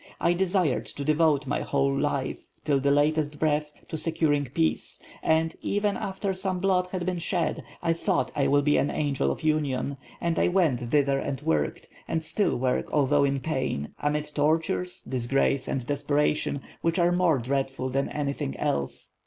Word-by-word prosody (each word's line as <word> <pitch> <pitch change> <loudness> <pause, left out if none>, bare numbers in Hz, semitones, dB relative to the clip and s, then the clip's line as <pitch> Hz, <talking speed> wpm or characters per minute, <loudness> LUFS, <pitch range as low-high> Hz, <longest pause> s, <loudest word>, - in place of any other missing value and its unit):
I 170 - +3
desired 180 -6 +1
to 140 - -6
devote 155 -1 +3
my 135 - -1
whole 140 -1 +1
life, 140 -1 -2 0.2
till 140 -3 +2
my 140 - +2
latest 150 +1 +2
breath, 150 -1 +1 0.2
to - - -5
securing 155 -2 +1
peace; 80 - -1 0.2
and, 160 0 +2
even 205 0 0
after 195 0 -2
some 185 -1 -2
blood 180 -1 +2
had 180 -2 -2
been 180 -1 -1
shed, 170 +1 -1 0.2
I 165 -1 +3
thought, 180 +2 0
I 140 - +2
will 145 0 +3
be 150 0 +3
an 140 - +2
angel 140 - 0
of - - -6
union; 140 -3 0 0.2
and 170 -1 0
I - - +4
went 175 -9 +2
thither 135 +3 +2
and 135 -1 -3
worked, 75 -2 -1 0.2
and 165 0 -1
still 160 +6 0
work 125 0 0
although 145 0 +3
in 140 -1 0
pain, 130 - -2
amid 150 +1 0
tortures, 160 +4 0
disgrace 130 +2 0
and 130 -3 -2
desperation, 145 0 0 0.2
which 165 0 +1
are 175 -1 +4
more 175 -4 +3
dreadful 135 +1 -2
than 135 +2 0
anything 140 - -3
else. 70 -1 -2
145 Hz, 170 wpm, -27 LUFS, 135-165 Hz, 0.2 s, I